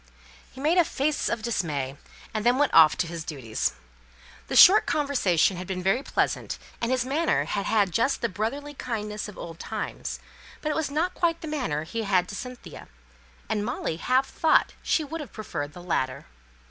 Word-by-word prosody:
He 260 - -13
made 315 +6 +3
a - - +7
face 300 -1 -1
of 225 - -2
dismay, 150 - -2 0.4
and 215 -1 -2
then 245 +2 +4
went 290 0 +2
off 160 -2 +7
to - - +1
his 165 -1 -5
duties. 130 -9 -2 0.7
The - - -3
short 405 +4 +9
conversation 205 - +2
had 180 0 -6
been 185 -1 -3
very 195 +7 +2
pleasant, - - -1 0.2
and 230 - 0
his 255 -1 +1
manner 305 +6 +1
had 200 -1 -2
had 205 -4 +2
just 230 +10 +1
the 235 - +2
brotherly 235 +9 -3
kindness 215 -6 -4
of 210 - -12
old 165 0 -8
times; - - -5 0.4
but 305 - -2
it - - -1
was 320 -2 -1
not 320 +6 0
quite 335 -1 0
the 320 - -6
manner 255 - -2
he 205 +8 -4
had 190 -4 +2
to 205 - -6
Cynthia; 250 +2 -8 0.6
and 210 -1 -1
Molly 215 -8 -3
half 255 +9 +2
thought 320 - +2
she 315 - +1
would 320 +2 -5
have 290 - -9
preferred 145 -9 -5
the 175 - -10
latter. 130 -7 -1
225 Hz, 190 wpm, -26 LUFS, 180-285 Hz, 0.7 s, short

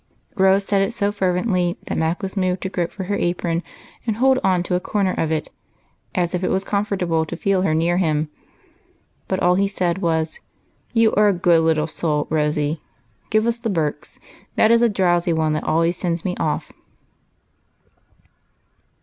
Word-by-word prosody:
" - - -43
Rose 190 +1 +4
said 200 -1 +2
it 195 +4 0
so 205 -3 0
fervently, 180 -2 0
that - - -3
Mac 160 +4 -1
was 190 +1 -4
moved 185 -1 0
to 190 - -2
grope 175 -3 -2
for 190 - -6
her 200 +2 -2
apron 175 -1 -1 0.5
and 220 - +1
hold 260 +3 +3
on 185 -2 +2
to 180 - -3
a 180 - +2
corner 195 0 0
of 160 - -1
it, 155 -1 -2 0.7
as 175 -1 0
if 180 +1 -2
it - - +1
was 190 +1 0
comfortable 195 -6 0
to 160 - -6
feel 190 +2 +1
her 160 -4 +1
near 170 +2 +1
him. 155 -4 +1 1.0
But 190 0 -1
all 180 0 +4
he 195 +2 +2
said 180 -2 -1
was, 160 -2 -1
— - - -41
" - - -40
You 225 -2 +3
are 210 +1 +4
a 205 - +4
good 175 -2 +3
little 160 -2 +2
soul. 155 -2 -1
Rosy. 150 0 0 0.5
Give 215 0 +2
us 235 0 0
' - - -27
The 230 -1 -2
Birks;'that 160 +5 -2
is 235 0 +5
a 235 - +4
drowsy 175 -4 +1
one 160 -1 +1
that 155 - -2
always 165 +2 +1
sends 170 -2 -2
me 180 -1 -1
off." 155 - -2
180 Hz, 190 wpm, -21 LUFS, 165-195 Hz, 1.0 s, is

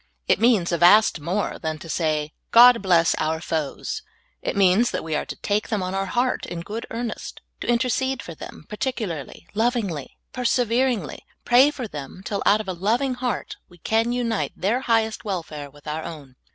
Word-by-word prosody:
It - - +3
means 220 -7 +3
a 170 - 0
vast 180 +1 +6
more 180 +8 -2
than 160 -1 -3
to 160 - -11
say, 155 -2 -1 0.2
*'God 240 0 +8
bless 175 -4 +4
our 160 +1 0
foes." 160 -4 -3 0.4
It - - -3
means 195 +5 +4
that - - -3
we 160 -1 -4
are 150 - -1
to - - -6
take 210 +1 -1
them 210 -4 -1
on 185 +1 -3
our 195 0 -1
heart 245 +6 0
in 170 - -5
good 215 +6 -6
earnest, 230 -1 -5 0.2
and - - -4
intercede 255 +2 +1
for 170 - -8
them, 155 - -10
particularly, 210 - -4
lovingly, 210 - -1 0.2
perse 250 -2 +1
veringly 240 - 0 0.2
— - - -48
pra}^ 255 +4 +6
for 255 -5 -5
them 150 +2 -8
till 200 -2 -2
out 205 +1 +5
of 215 - -11
a 185 - -2
loving 230 +9 0
heart 245 -4 -3
we 175 - -17
can 225 +6 +1
unite 235 -3 -1
their 210 +7 0
highest 225 -3 +1
welfare 160 -8 -5
with 145 +1 -18
our 155 +1 -3
own. 145 -6 -9
205 Hz, 190 wpm, -23 LUFS, 165-235 Hz, 0.4 s, God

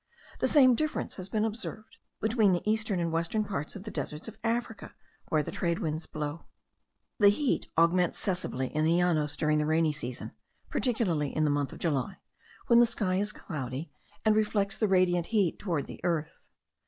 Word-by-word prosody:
The - - +2
same 260 -4 +6
difference 310 +5 -2
has 185 0 -6
been 215 +2 +1
observed 220 0 -6 0.2
between 220 -3 +3
the 175 - -2
eastern 215 -3 +1
and 170 -1 -1
western 170 +6 0
parts 190 -6 -4
of 195 - -7
the 215 - -7
deserts 150 +6 -5
of 225 - -10
Africa, 230 -1 -2 0.3
where 155 -1 +2
the - - -6
trade 170 -2 -1
winds 155 +1 -3
blow. 150 +1 -5 0.7
The 205 -2 +8
heat 270 +6 0
augments 170 +1 +3
sensibly 175 -9 -2
in 155 - +2
the 165 +2 +3
Llanos 155 -4 +1
during 150 0 +2
the 150 - +1
rainy 160 0 +3
season, 125 -4 -6 0.4
particularly 180 - 0
in 155 - +2
the 150 - +3
month 145 -2 0
of - - -9
July, 160 +3 -1 0.5
when 235 0 +6
the 240 - +6
sky 205 -5 -1
is 205 +2 0
cloudy, 140 -4 -6 0.3
and 215 -1 +5
reflects 210 -2 +1
the 215 - +1
radiant 180 -3 +3
heat 205 -7 +1
toward 170 -8 -1
the - - -11
earth. 165 -3 -2
180 Hz, 185 wpm, -29 LUFS, 155-215 Hz, 0.7 s, The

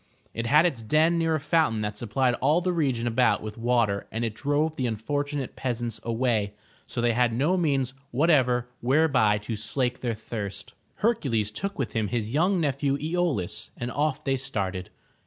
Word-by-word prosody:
It 115 +1 -3
had 150 +6 +5
its 140 -10 0
den 155 +9 +3
near 165 -1 +2
a - - 0
fountain 145 -7 +1
that 105 0 -3
supplied 120 +3 0
all 155 +3 +4
the 180 0 0
region 135 -8 0
about 115 -3 +2
with 110 -1 -6
water 115 -4 +1
and 115 +1 -2
it 110 - -3
drove 145 +6 0
the 130 -4 -1
unfortunate 145 +5 -3
peasants 120 -3 -3
away, 115 -3 0 0.3
so 120 - -3
they 120 -1 +2
had 120 0 +2
no 145 +10 +2
means 140 -7 +1 0.2
whatever 125 -4 +3
whereby 130 -5 +3
to 105 +2 -5
slake 120 +4 -1
their 120 -3 -1
thirst. 100 -2 -6 0.3
Hercules 115 - +1
took 195 - -4
with 135 - -2
him 110 -2 0
his 110 +1 -2
young 180 +5 +3
nephew 140 -2 0
Po 170 +4 0
laus, 90 -9 -3
and 120 +1 -4
off 145 0 -1
they 135 0 +1
started. 100 -9 -3
125 Hz, 180 wpm, -26 LUFS, 115-150 Hz, 0.3 s, had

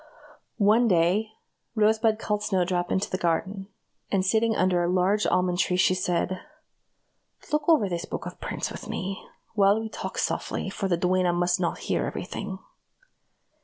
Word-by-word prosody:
One 220 +3 +4
day, 185 +3 +2 0.5
Rosebud 220 0 +3
called 210 -1 -2
Snowdrop 180 -3 0
into 190 - +1
the 185 - -3
garden, 190 +3 -1 0.4
and 190 -2 +1
sitting 225 +3 +2
under 180 -1 +2
a 175 - 0
large 190 +3 +2
almond 180 0 +1
tree, 180 -1 +2
she 185 - +4
said: 180 0 -1 1.1
"Look 300 +1 +1
over 305 -11 +5
this 175 -2 -3
book - - -5
of - - -8
prints - - -3
with - - -8
me, 195 +1 -4 0.3
while 200 0 +4
we 220 0 -5
talk - - -6
softly, - - -2
for 195 - -2
the 175 -2 +1
duenna 180 0 +2
must 175 0 +1
not 175 -2 -1
hear - - -1
every - - -4
thing." 190 - -5
190 Hz, 165 wpm, -26 LUFS, 180-210 Hz, 1.1 s, over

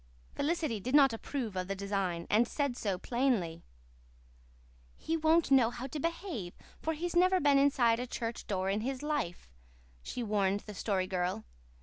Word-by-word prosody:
Felicity 305 -7 -1
did 255 +8 -1
not 275 -4 +6
approve 225 -2 -4
of 185 -1 -2
the 195 - -2
design, 195 -4 -2
and 225 +3 +3
said 280 -4 -1
so 200 -6 -2
plainly. 210 -8 0 1.4
"He 325 - -2
won't 320 -1 +3
know 255 -4 +6
how 240 +1 -6
to 285 +3 -5
behave, 330 - -4 0.3
for 320 - -1
he's 345 +3 -3
never 370 +1 +5
been 285 -3 +4
inside 250 -5 +3
a 250 - -3
church 235 -1 -4
door 190 -2 -1
in 200 +2 0
his 260 +3 -3
life," 295 - -2 0.5
she 245 - -5
warned 205 -2 +1
the 210 - -9
Story 190 -2 -1
Girl. 180 - -2
240 Hz, 165 wpm, -32 LUFS, 195-285 Hz, 1.4 s, not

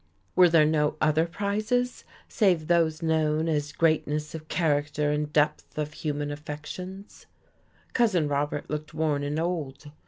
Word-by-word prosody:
Were 180 -1 +7
there 165 -2 +5
no 150 -1 +1
other 155 +2 +2
prizes 215 +7 -1 0.2
save 180 -7 +2
those 165 -1 +2
known 160 0 +1
as 150 -2 -1
greatness 150 -1 0
of 155 -1 -8
character 150 -3 0
and 150 0 -1
depth 150 0 0
of 150 0 -3
human 145 -1 -3
affections? 155 +7 -8 0.7
Cousin 200 -11 +2
Robert 145 0 -1
looked 150 0 -5
worn 155 -2 0
and 145 +2 -2
old. 155 -4 -3
155 Hz, 135 wpm, -27 LUFS, 150-170 Hz, 0.7 s, Were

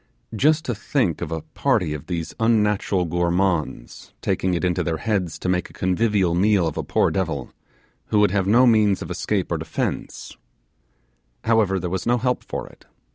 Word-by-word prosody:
Just 155 +7 +3
to 120 - -1
think 105 - -1
of 85 -2 -4
a 80 -2 -3
party 110 - +1
of 75 - -7
these 85 -3 -4
unnatural 105 -4 +2
gourmands 85 -5 -1
taking 90 -1 0
it 85 - -1
into 90 -1 0
their 80 -1 -1
heads 95 -4 -1
to - - -5
make 90 0 0
a - - -17
convivial 95 -1 +1
meal 95 0 +3
of 80 - -2
a - - -1
poor - - +1
devil, 80 -9 -3 0.5
who 105 - +2
would 105 -2 +4
have 95 -1 0
no 120 +5 +5
means 105 -5 +3
of 85 - -8
escape 90 +1 -2
or 85 - 0
defence: 80 0 -4 1.1
however, 110 -4 +2
there 90 - -3
was 95 +2 -3
no 120 +1 +3
help 125 +1 -1
for - - -5
it. - - -18
95 Hz, 185 wpm, -22 LUFS, 85-110 Hz, 1.1 s, no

